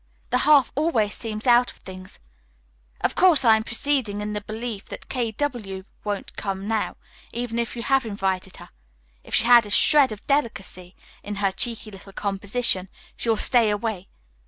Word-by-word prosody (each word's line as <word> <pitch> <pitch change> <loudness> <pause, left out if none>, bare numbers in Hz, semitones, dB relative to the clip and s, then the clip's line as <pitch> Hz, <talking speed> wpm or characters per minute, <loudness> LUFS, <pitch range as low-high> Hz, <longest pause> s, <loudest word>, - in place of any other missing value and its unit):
The 250 - +3
half 285 -4 +6
always 250 -9 +1
seems 215 -2 -3
out 245 0 +5
of - - -21
things. 185 0 -11 0.8
Of - - +1
course, 335 -8 +4
I 225 -1 +7
am 220 - -1
proceeding 235 -3 0
in 210 0 -4
the 210 - -3
belief 220 0 -6
that - - -10
K. 240 -4 -1
W. 215 -8 -4 0.2
won't 205 -2 -4
come 195 0 -4
now, 220 -1 -1 0.3
even 235 -1 -3
if 235 - -3
you 235 - -5
have 270 +1 +2
invited 190 -3 -3
her. - - -12 0.5
If - - -3
she - - +4
has 240 -2 +7
a - - -9
shred 285 +5 +5
of 210 - -9
delicacy 195 -10 -2 0.3
in 205 0 -6
her 200 -1 0
cheeky 225 +2 -2
little 195 0 -13
composition, 200 0 -1 0.3
she 235 - -3
will 225 - +3
stay 235 0 +3
away. 205 -2 -3
220 Hz, 180 wpm, -24 LUFS, 200-245 Hz, 0.8 s, I